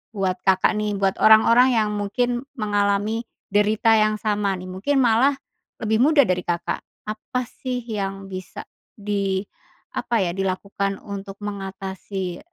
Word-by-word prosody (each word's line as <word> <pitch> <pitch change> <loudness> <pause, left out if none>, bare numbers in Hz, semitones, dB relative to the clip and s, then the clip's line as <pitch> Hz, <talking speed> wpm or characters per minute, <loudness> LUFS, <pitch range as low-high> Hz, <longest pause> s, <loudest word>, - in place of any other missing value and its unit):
buat 190 -2 -1
Kakak, 190 -1 +4
nih, 210 -1 -1
buat 195 -1 +1
orang-orang 230 +4 +6
yang 215 -2 +2
mungkin 240 +5 -1
mengalami 210 0 0 0.2
derita 210 +2 +3
yang 215 0 +3
sama, 210 -2 0
nih, 185 0 -8
mungkin 265 +9 +1
malah 245 +4 +4 0.5
lebih 220 0 +1
muda 285 +3 +6
dari 180 -5 -1
Kakak, 170 -1 -1 0.2
apa, 215 +4 -4
sih, 250 0 -5
yang 195 -3 -4
bisa 185 -1 -7 0.3
di 200 -2 -1 0.5
apa, 230 -4 0
ya, 175 - -1
dilakukan 195 +1 -2
untuk 200 -1 -7
mengatasi 195 -2 -5
205 Hz, 135 wpm, -23 LUFS, 195-225 Hz, 0.5 s, orang-orang